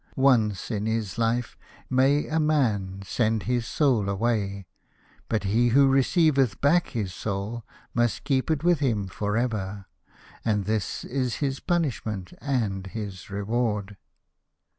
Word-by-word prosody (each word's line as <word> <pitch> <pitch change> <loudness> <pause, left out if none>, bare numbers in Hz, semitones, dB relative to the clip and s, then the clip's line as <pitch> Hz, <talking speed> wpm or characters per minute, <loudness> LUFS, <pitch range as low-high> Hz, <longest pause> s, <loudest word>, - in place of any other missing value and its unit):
Once 120 -7 +2
in 105 -1 -1
his 110 -2 -2
life 115 +1 0 0.3
may 135 +3 +3
a 160 +1 0
man 110 -11 +1
send 110 0 0
his 120 -1 -1
Soul 125 -10 +2
away, 100 -2 -1 0.6
but 110 -2 0
he 110 +5 +2
who 135 +4 +5
receiveth 135 - +3
back 170 +5 +3
his 105 -8 -3
Soul 100 +5 -4 0.3
must 120 -2 +1
keep 135 -1 0
it 155 -1 0
with 175 -3 +4
him 115 -8 0
for 105 +4 -2
ever, 105 -5 -2 0.6
and 105 -3 0
this 110 -1 -2
is 125 -2 -2
his 135 -2 -2
punishment 115 - -2
and 110 -9 -1
his 100 -3 -7
reward." 105 0 -1
115 Hz, 135 wpm, -26 LUFS, 100-135 Hz, 0.6 s, who